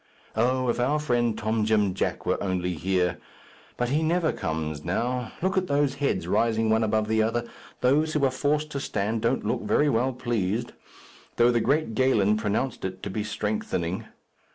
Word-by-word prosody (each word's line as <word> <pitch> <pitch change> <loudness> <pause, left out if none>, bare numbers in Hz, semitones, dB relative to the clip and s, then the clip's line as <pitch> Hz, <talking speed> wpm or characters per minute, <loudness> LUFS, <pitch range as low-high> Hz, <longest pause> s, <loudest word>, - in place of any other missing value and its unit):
Oh, 130 +3 +1
if 120 - 0
our 135 +5 +2
friend 120 -6 +1
Tom 110 0 0
Jim 105 -3 +2
Jack 95 - -2
were - - 0
only 90 -2 -1
here! 90 0 0 0.6
but 120 0 0
he 150 +4 +1
never 165 +1 +1
comes 80 -1 -3
now. 120 +7 -1
Look 190 0 +1
at 185 - -5
those 140 -2 +2
heads 140 - 0
rising 115 -1 +2
one 110 +1 +3
above 110 0 +1
the 110 0 +2
other. 115 +2 0 0.3
Those 150 +5 +3
who 150 -2 +2
are 130 - +2
forced 150 +3 0
to 140 - -3
stand 110 -2 -2
don't - - 0
look - - 0
very 150 - +2
well 125 +1 +1
pleased, 120 -2 -1 0.6
though 120 +1 +5
the 120 -1 +2
great 145 -4 +1
Galen 110 -4 +3
pronounced 110 +4 -1
it 95 0 -5
to 100 - -4
be 105 +2 -2
strengthening. 105 -5 -2
115 Hz, 180 wpm, -26 LUFS, 105-130 Hz, 0.6 s, though